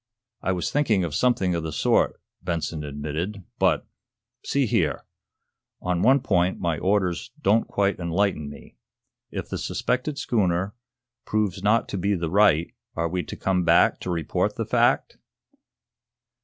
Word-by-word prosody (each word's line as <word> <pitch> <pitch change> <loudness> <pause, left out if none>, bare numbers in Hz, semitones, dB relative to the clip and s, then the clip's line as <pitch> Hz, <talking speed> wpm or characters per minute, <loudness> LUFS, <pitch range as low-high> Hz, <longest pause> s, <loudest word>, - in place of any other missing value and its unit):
"I 95 - 0
was 90 -2 -1
thinking 115 -10 +2
of 85 -4 -3
something 100 -4 +2
of 85 - -1
the 80 0 -4
sort," - - +2 0.2
Benson 80 -2 -3
admitted. 75 +8 -4 0.2
"But - - +2 0.6
see 140 -1 +1
here! 110 - 0 0.7
On 90 -1 -1
one 135 +5 +5
point 90 -4 +1
my 85 -4 -1
orders 95 -2 0
don't 115 -5 +2
quite 100 -1 0
enlighten 85 -3 0
me. 70 -4 -13 0.5
If - - -5
the - - -3
suspected 130 +4 -1
schooner 100 -8 0 0.5
proves 105 -4 -1
not 110 +3 +3
to 100 - -3
be 100 +3 +1
the 85 -3 -3
right 95 -5 +4 0.2
are 85 0 0
we 90 +2 -1
to - - -7
come 95 -2 +1
back 85 0 +4
to - - -5
report 85 -4 -1
the - - -2
fact?" - - +2
90 Hz, 150 wpm, -25 LUFS, 85-105 Hz, 0.7 s, one